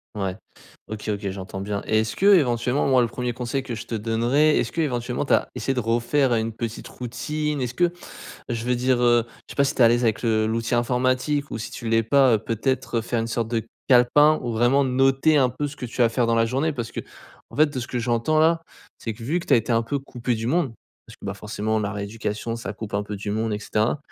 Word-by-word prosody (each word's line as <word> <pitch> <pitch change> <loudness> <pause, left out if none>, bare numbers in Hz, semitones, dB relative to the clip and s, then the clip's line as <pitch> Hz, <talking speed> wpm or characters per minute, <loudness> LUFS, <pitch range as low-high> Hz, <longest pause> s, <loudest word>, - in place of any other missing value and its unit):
Ouais, 95 -1 -2 0.5
OK, 110 0 -6
OK, 100 -1 -2
j'entends 95 0 -6
bien 100 0 -3
et 110 0 +2
est-ce 110 0 -2
que 195 - -1
éventuellement, 125 -2 +1
moi, 130 -2 +4
le 120 - +2
1er 125 0 -3
conseil 125 +2 -3
que 120 -3 -5
je 110 - -7
te 115 - -4
donnerai, 120 +8 +2
est-ce - - 0
que 165 - -5
éventuellement 125 -2 -1
tu - - +1
as - - +2
essayé 135 - -1
de 125 - -1
refaire 120 +4 +1
une 110 0 -1
petite 115 0 -5
routine? 150 +5 -3
Est-ce 125 -1 -2
que 175 +6 +2 0.6
je 115 0 -3
veux 125 - +2
dire, 125 0 +1
heu, 120 -1 +4
je - - -21 0.2
sais - - -24
pas 140 - +4
si 140 - -1
tu - - -5
es - - +8
à - - +7
l'aise 120 +1 +2
avec 110 -2 +1
le 110 -2 +2
l'outil 115 +2 -1
informatique 130 +4 0
ou - - -4
si 110 - -6
tu 115 - -6
l'es 115 0 +3
pas, 130 0 +4
heu, - - +3
peut-être, 115 +3 -2
heu, - - +1
faire 115 +1 -2
une 115 - -2
sorte 115 -1 -2
de 115 -1 -2 0.2
calepin, 145 +5 +5
où 120 -2 -2
vraiment 120 +5 +3
noter 135 +4 +3
un 130 - +4
peu 135 +4 -3
ce 145 0 -8
que 125 - -5
tu 120 +2 -1
as - - +6
à 115 - +4
faire 120 0 +1
dans 115 - +2
la 115 0 +3
journée. 140 +6 0
Parce 120 -3 -5
qu'en - - -11
fait 155 0 +5
de 130 - -3
ce 120 - -5
que 125 - -3
j'entends 120 +6 +1
là, 165 +1 +4 0.4
c'est 110 -2 -4
que, 115 - -12
vu 160 +9 0
que - - -11
tu - - +5
as - - +7
été 115 +1 0
un 115 0 +3
peu 140 +5 -2
coupé 125 -3 -3
du 115 +1 -4
monde 145 -4 0 0.3
parce - - -14
que, - - -15
bah, 100 - -2
forcément 105 +2 -2
la 100 -1 -2
rééducation 105 +2 -4
ça 115 - -6
coupe 110 -2 -8
un 100 0 0
peu 105 0 -6
du 100 +1 -5
monde 110 0 -1
et 105 - -3
cetera. 110 +5 0
120 Hz, 265 wpm, -24 LUFS, 115-135 Hz, 0.6 s, es